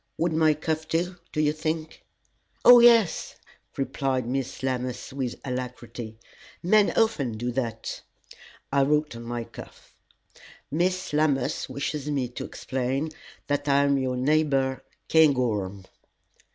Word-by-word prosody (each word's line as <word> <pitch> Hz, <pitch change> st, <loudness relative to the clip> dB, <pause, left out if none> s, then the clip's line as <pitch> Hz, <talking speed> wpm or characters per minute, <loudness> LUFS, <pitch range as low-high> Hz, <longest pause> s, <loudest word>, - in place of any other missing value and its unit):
Would 170 Hz, 0 st, 0 dB
my 155 Hz, -1 st, +4 dB
cuff 160 Hz, +1 st, -3 dB
do, 175 Hz, +3 st, -1 dB
do 155 Hz, -, -3 dB
you 150 Hz, -1 st, +3 dB
think?" 155 Hz, 0 st, -4 dB, 0.6 s
"Oh, 245 Hz, 0 st, +10 dB
yes!" 230 Hz, -5 st, +4 dB, 0.4 s
replied 135 Hz, -2 st, -1 dB
Miss 130 Hz, +1 st, -3 dB
Lammas, 130 Hz, -1 st, -3 dB
with 130 Hz, -3 st, -3 dB
alacrity; 125 Hz, -3 st, -6 dB, 0.5 s
"men 205 Hz, +3 st, +4 dB
often 150 Hz, -, +2 dB
do 120 Hz, +2 st, -2 dB
that." 115 Hz, -3 st, -4 dB, 0.7 s
I 140 Hz, -, +4 dB
wrote 150 Hz, -1 st, +1 dB
on 115 Hz, -, -8 dB
my 120 Hz, 0 st, -4 dB
cuff: -, -, -13 dB, 0.8 s
"Miss 180 Hz, +2 st, 0 dB
Lammas 145 Hz, -4 st, +1 dB
wishes 145 Hz, +1 st, -3 dB
me 135 Hz, -4 st, -1 dB
to 120 Hz, -, -6 dB
explain 135 Hz, +4 st, -2 dB, 0.4 s
that 145 Hz, 0 st, -1 dB
I 140 Hz, 0 st, +4 dB
am 140 Hz, -1 st, +2 dB
your 130 Hz, -1 st, -1 dB
neighbor, 135 Hz, -1 st, +1 dB, 0.3 s
Cairngorm." 115 Hz, -11 st, +2 dB
140 Hz, 125 wpm, -26 LUFS, 125-155 Hz, 0.8 s, Oh